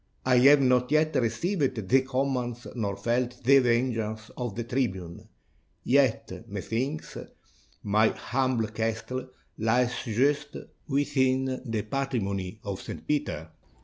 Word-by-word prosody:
I 125 Hz, -1 st, +4 dB
have 140 Hz, +3 st, +7 dB
not 125 Hz, 0 st, +3 dB
yet 155 Hz, +1 st, +2 dB
received 130 Hz, -, 0 dB
the 130 Hz, +4 st, +5 dB
commands 130 Hz, -2 st, -2 dB
nor 100 Hz, -5 st, -2 dB
felt 120 Hz, +3 st, -1 dB
the 135 Hz, +3 st, +7 dB
venge 120 Hz, -1 st, +2 dB
ance 110 Hz, 0 st, -4 dB
of 120 Hz, -5 st, -4 dB
the 120 Hz, -, -3 dB
tribune; 105 Hz, -9 st, -3 dB, 0.5 s
yet, -, -, +1 dB
methinks, 135 Hz, +7 st, -3 dB, 0.7 s
my 105 Hz, +2 st, +3 dB
humble 125 Hz, -3 st, -1 dB
castle 115 Hz, +4 st, -3 dB, 0.3 s
lies 120 Hz, +3 st, +2 dB
just 140 Hz, +6 st, 0 dB, 0.3 s
within 130 Hz, -2 st, +1 dB
the 115 Hz, -3 st, -2 dB
patrimony 105 Hz, -6 st, -2 dB
of 100 Hz, -2 st, -5 dB
St. -, -, -8 dB
Peter." 80 Hz, -, -2 dB
125 Hz, 120 wpm, -27 LUFS, 110-135 Hz, 0.7 s, have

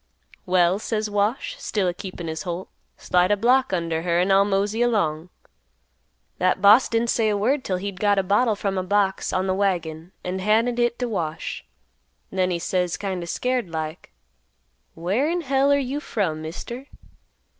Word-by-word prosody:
'Well,' 180 Hz, +1 st, +3 dB
says 215 Hz, -1 st, -2 dB
Wash, 215 Hz, -, -1 dB
still 200 Hz, -4 st, -1 dB
a 175 Hz, -, 0 dB
keepin' 180 Hz, -1 st, -7 dB
his 160 Hz, 0 st, -4 dB
holt; 175 Hz, +1 st, -5 dB, 0.3 s
slide 180 Hz, 0 st, +2 dB
a 205 Hz, -, +3 dB
block 255 Hz, +5 st, +3 dB
under 165 Hz, -3 st, -1 dB
her 170 Hz, 0 st, +1 dB
an' 185 Hz, +2 st, +2 dB
I'll 195 Hz, +1 st, +6 dB
mosey 205 Hz, +3 st, 0 dB
along! 180 Hz, -9 st, 0 dB, 1.1 s
"That 185 Hz, +1 st, +2 dB
boss 205 Hz, +6 st, +6 dB
didn't 230 Hz, 0 st, +1 dB
say 220 Hz, -2 st, +2 dB
a 205 Hz, -, +1 dB
word 255 Hz, +7 st, +1 dB
'till 185 Hz, -, -1 dB
he'd 195 Hz, 0 st, -5 dB
got 205 Hz, -1 st, +3 dB
a 195 Hz, -, +2 dB
bottle 210 Hz, +4 st, +2 dB
from 195 Hz, -2 st, -2 dB
a -, -, -2 dB
box 195 Hz, 0 st, +1 dB
on 185 Hz, 0 st, 0 dB
th' 185 Hz, -, +1 dB
wagon 175 Hz, -4 st, -1 dB
an' 180 Hz, +1 st, -3 dB
handed, 225 Hz, +5 st, +2 dB
hit 240 Hz, 0 st, +1 dB
t' 250 Hz, -, -2 dB
Wash; 165 Hz, -8 st, -4 dB, 0.7 s
then 185 Hz, -1 st, +1 dB
he 175 Hz, -, 0 dB
says 175 Hz, 0 st, -1 dB
kind 190 Hz, -3 st, -3 dB
o' 170 Hz, -, -6 dB
scared 250 Hz, +1 st, -1 dB
like, 160 Hz, 0 st, -5 dB, 0.8 s
'Where 195 Hz, -, 0 dB
in 350 Hz, +1 st, 0 dB
hell 275 Hz, -1 st, +2 dB
are 285 Hz, -, +5 dB
you 275 Hz, +1 st, -2 dB
from, 180 Hz, -, -2 dB
Mister? 235 Hz, -, -7 dB
195 Hz, 180 wpm, -23 LUFS, 180-230 Hz, 1.1 s, I'll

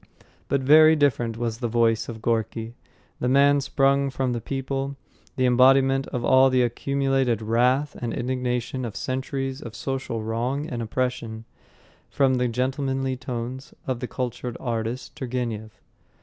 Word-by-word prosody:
But 140 Hz, -, +1 dB
very 155 Hz, +4 st, +7 dB
different 120 Hz, -6 st, +1 dB
was 115 Hz, -1 st, -3 dB
the 120 Hz, -, -1 dB
voice 115 Hz, -1 st, +1 dB
of 110 Hz, -2 st, -8 dB
Gorky, 115 Hz, 0 st, -1 dB, 0.5 s
the 125 Hz, -, -1 dB
man 140 Hz, +2 st, +5 dB
sprung 140 Hz, 0 st, +2 dB
from 130 Hz, -1 st, -1 dB
the 120 Hz, -, -3 dB
people, 135 Hz, +2 st, -3 dB, 0.4 s
the 130 Hz, -2 st, +1 dB
embodiment 135 Hz, +2 st, +4 dB
of 125 Hz, -3 st, -3 dB
all 130 Hz, 0 st, +6 dB
the 130 Hz, -1 st, +3 dB
accumulated 135 Hz, -1 st, 0 dB
wrath 125 Hz, +6 st, +1 dB
and 120 Hz, -1 st, -2 dB
indignation 125 Hz, +1 st, -2 dB
of 115 Hz, -4 st, -5 dB
centuries 135 Hz, +1 st, -3 dB
of 115 Hz, -2 st, -8 dB
social 130 Hz, -4 st, -3 dB
wrong 125 Hz, +7 st, -2 dB
and 120 Hz, -5 st, -4 dB
oppression, 115 Hz, -1 st, -3 dB, 0.6 s
from 135 Hz, -2 st, +2 dB
the 125 Hz, 0 st, +1 dB
gentlemanly 130 Hz, +2 st, -1 dB
tones 125 Hz, 0 st, -6 dB
of 130 Hz, -2 st, -2 dB
the 125 Hz, -, -4 dB
cultured 125 Hz, -1 st, -4 dB
artist 120 Hz, +2 st, -3 dB
Turgenev. 120 Hz, -6 st, -4 dB
130 Hz, 145 wpm, -24 LUFS, 120-135 Hz, 0.6 s, very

